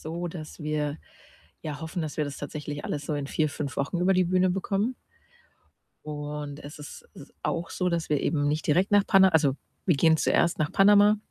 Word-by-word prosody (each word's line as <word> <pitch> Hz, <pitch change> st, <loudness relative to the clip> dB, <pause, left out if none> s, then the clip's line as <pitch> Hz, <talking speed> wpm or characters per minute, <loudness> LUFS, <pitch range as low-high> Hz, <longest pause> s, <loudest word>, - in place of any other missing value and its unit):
so, 170 Hz, +2 st, -4 dB
dass 160 Hz, -1 st, -9 dB
wir 150 Hz, 0 st, -2 dB, 0.6 s
ja 150 Hz, -2 st, -5 dB
hoffen, 160 Hz, +1 st, -4 dB
dass 155 Hz, -, -5 dB
wir 150 Hz, -, 0 dB
das 140 Hz, -1 st, -6 dB
tatsächlich 145 Hz, 0 st, -6 dB
alles 145 Hz, -1 st, -4 dB
so 150 Hz, -, -1 dB
in 145 Hz, -1 st, -3 dB
4, 155 Hz, +1 st, 0 dB
5 145 Hz, -1 st, -5 dB
Wochen 140 Hz, +6 st, -1 dB
über 185 Hz, +2 st, +3 dB
die 185 Hz, 0 st, +3 dB
Bühne 185 Hz, +1 st, +2 dB
bekommen. 200 Hz, +6 st, -1 dB, 1.1 s
Und 150 Hz, -1 st, -6 dB
es 150 Hz, +2 st, -10 dB
ist 150 Hz, -, -11 dB
s 140 Hz, -, -13 dB
auch 165 Hz, 0 st, -2 dB
so, 180 Hz, -1 st, -1 dB
dass 170 Hz, -2 st, -2 dB
wir 150 Hz, -, +2 dB
eben 145 Hz, -1 st, 0 dB
nicht 155 Hz, +1 st, -1 dB
direkt 180 Hz, +8 st, +2 dB
nach 205 Hz, -1 st, +5 dB
Pana 190 Hz, -2 st, +6 dB
also, 150 Hz, -5 st, +2 dB, 0.3 s
wir 175 Hz, -6 st, +3 dB
gehen 160 Hz, +2 st, +4 dB
zuerst 170 Hz, +2 st, +2 dB
nach 150 Hz, -1 st, -1 dB
Panama, 205 Hz, +1 st, +6 dB
155 Hz, 200 wpm, -27 LUFS, 145-180 Hz, 1.1 s, Pana